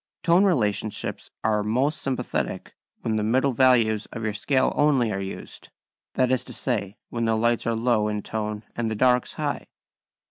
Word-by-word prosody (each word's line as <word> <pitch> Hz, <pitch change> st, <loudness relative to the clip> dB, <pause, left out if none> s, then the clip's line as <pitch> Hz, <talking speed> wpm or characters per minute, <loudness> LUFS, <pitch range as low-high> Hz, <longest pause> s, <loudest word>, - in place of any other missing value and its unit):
#Tone 175 Hz, +4 st, +5 dB
relationships 110 Hz, -, -1 dB
are 110 Hz, -1 st, +2 dB
most 130 Hz, +8 st, 0 dB
sympathetic 135 Hz, -2 st, -3 dB, 0.3 s
when 110 Hz, -1 st, -1 dB
the 105 Hz, -, 0 dB
middle 130 Hz, +5 st, +2 dB
values 115 Hz, -4 st, +3 dB
of 115 Hz, -, -7 dB
your 110 Hz, -1 st, -1 dB
scale 130 Hz, +5 st, +1 dB
only 135 Hz, -6 st, +3 dB
are 95 Hz, -, -2 dB
used, 95 Hz, 0 st, -8 dB, 0.5 s
that 130 Hz, -1 st, +2 dB
is 130 Hz, -, +2 dB
to -, -, -6 dB
say, 105 Hz, -6 st, -2 dB
when 115 Hz, -1 st, -2 dB
the 110 Hz, 0 st, +2 dB
lights 120 Hz, +1 st, +1 dB
are 115 Hz, -, +1 dB
low 115 Hz, -2 st, +2 dB
in 105 Hz, -1 st, -2 dB
tone 105 Hz, -1 st, -4 dB
and 115 Hz, -1 st, -1 dB
the 110 Hz, -, -2 dB
darks 125 Hz, +2 st, +2 dB
high. -, -, -3 dB
115 Hz, 175 wpm, -25 LUFS, 105-130 Hz, 0.5 s, Tone